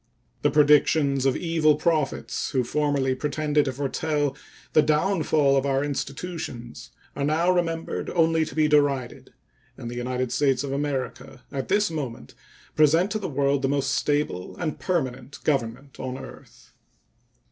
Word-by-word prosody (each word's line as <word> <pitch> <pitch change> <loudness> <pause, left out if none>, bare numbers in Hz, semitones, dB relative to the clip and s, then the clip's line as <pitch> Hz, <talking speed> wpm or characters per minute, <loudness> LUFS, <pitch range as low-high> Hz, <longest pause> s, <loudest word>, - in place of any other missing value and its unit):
The - - +3
predictions 145 -2 +4
of 130 - +1
evil 160 -3 +2
prophets, 155 -3 -1
who 130 -2 +1
formerly 140 0 0
pretended 150 +2 0
to 135 - -1
foretell 145 +1 -1 0.4
the 155 - +6
downfall 150 -2 +2
of 135 - +2
our 135 0 +1
institutions, 140 -5 -5 0.3
are 140 - -2
now 160 +5 +2
remembered 165 -2 -1
only 165 -1 +2
to 160 - -9
be 155 -1 +3
derided, 140 -3 +1 0.5
and 120 -2 -6
the - - -6
United 125 0 -2
States 135 -2 +2
of 140 - -4
America 135 -2 -4
at 135 -1 -4
this 205 -2 +2
moment 125 - -5 0.4
present 160 +6 +4
to 215 - -1
the 200 - -4
world 140 0 +1
the 135 - 0
most 140 -1 0
stable 145 -14 -1
and 160 -3 -3
permanent 135 -7 -2
Government 135 -1 -2
on 130 0 -4
earth. - - -13
145 Hz, 145 wpm, -25 LUFS, 135-155 Hz, 0.5 s, the